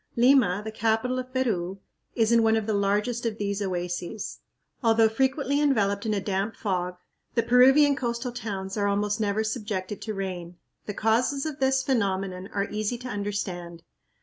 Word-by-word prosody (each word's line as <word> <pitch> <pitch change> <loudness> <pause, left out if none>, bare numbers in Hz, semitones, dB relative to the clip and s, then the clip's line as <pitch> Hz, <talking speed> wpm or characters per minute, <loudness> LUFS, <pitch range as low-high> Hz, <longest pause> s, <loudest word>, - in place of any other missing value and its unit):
Lima, 235 -6 +4
the 220 - -4
capital 225 +4 0
of 255 0 -6
Peru, 200 -8 -1 0.4
is 225 -1 +2
in 235 -1 +5
one 225 0 +4
of 220 -1 0
the 220 - 0
largest 210 +4 0
of 225 -2 -2
these 200 -1 -2
oases. 180 +1 -3 0.4
Although 225 -2 +5
frequently 270 +4 +1
enveloped 215 -7 +1
in 215 - +1
a - - +1
damp 195 +2 -2
fog, 180 -3 -2 0.4
the 230 - +3
Peruvian 270 +4 +6
coastal 240 -1 -2
towns 200 -5 -5
are 205 -1 +1
almost 205 +1 0
never 210 +1 +1
subjected 210 -3 -3
to 215 -2 -4
rain. 180 -3 -5 0.3
The 205 - -4
causes 250 +6 +1
of 305 -2 -4
this 265 0 +2
phenomenon 195 -7 -1
are 200 0 -1
easy 215 +3 -1
to 250 +1 -7
understand. 185 -5 -4
215 Hz, 170 wpm, -26 LUFS, 195-245 Hz, 0.4 s, Peruvian